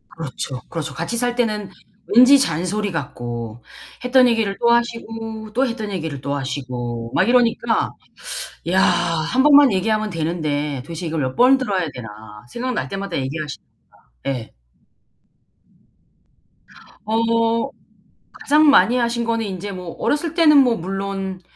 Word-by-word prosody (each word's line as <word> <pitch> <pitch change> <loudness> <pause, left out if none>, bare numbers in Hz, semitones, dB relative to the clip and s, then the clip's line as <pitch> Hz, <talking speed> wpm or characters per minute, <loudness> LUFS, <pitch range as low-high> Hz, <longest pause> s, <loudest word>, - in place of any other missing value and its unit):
그렇죠, 135 -4 -5
그렇죠. 155 -4 -4
같이 170 +11 -3
살 245 0 0
때는 215 -5 -1 0.5
왠지 255 +4 +8
잔소리 200 - -1
같고 120 -7 -5 0.4
했던 250 0 +5
얘기를 225 -4 0
또 235 - +3
하시고 225 -2 -2
또 260 +4 +2
했던 220 -3 -4
얘기를 160 -7 -4
또 140 +1 -2
하시고 125 -4 -4
막 190 - +2
이러니까 235 -1 +2 0.8
'야, 185 +2 +3
1 175 +7 +1
번만 285 -3 +7
얘기하면 215 +2 0
되는데 150 -4 -2
도대체 165 +5 -7
이걸 160 -1 -2
몇 130 0 -3
번을 260 +2 +6
들어야 195 -9 -1
되나.' 110 -2 -10
생각날 250 +1 -3
때마다 195 -2 -4
얘기하시니까. 145 +2 -6 0.5
예. 125 -4 -3 2.5
어. 230 +2 +1 0.7
가장 300 +1 +4
많이 250 -3 +5
하신 235 0 0
거는 230 -1 -1
인제 200 0 -5
뭐 180 -2 -7
어렸을 300 +2 0
때는 320 -3 +5
뭐 250 -4 +4
물론 195 +1 -4
195 Hz, 275 characters per minute, -20 LUFS, 155-235 Hz, 2.5 s, 왠지